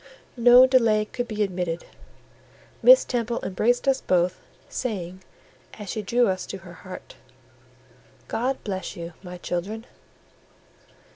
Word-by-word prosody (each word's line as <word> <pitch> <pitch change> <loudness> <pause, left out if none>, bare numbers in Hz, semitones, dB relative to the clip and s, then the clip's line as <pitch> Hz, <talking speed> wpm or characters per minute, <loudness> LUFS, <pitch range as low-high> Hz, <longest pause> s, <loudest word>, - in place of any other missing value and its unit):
no 245 +1 +8
delay 230 -5 +3
could 245 +3 -4
be 215 -2 -1
admitted; 180 -3 -3 1.0
Miss - - +8
Temple 235 -1 -2
embraced 240 +8 0
us 265 -1 +3
both, 180 0 +1 0.3
saying, 185 -6 -4 0.5
as 210 -3 -7
she 215 - -3
drew 240 +5 +2
us 185 -1 -2
to 195 - -6
her 175 -1 -13
heart— 185 +2 -11 1.1
"God 255 +4 -1
bless 190 -1 -4
you, 170 -1 -7
my 180 -1 -8
children!" 195 +6 -4
210 Hz, 125 wpm, -25 LUFS, 185-245 Hz, 1.1 s, no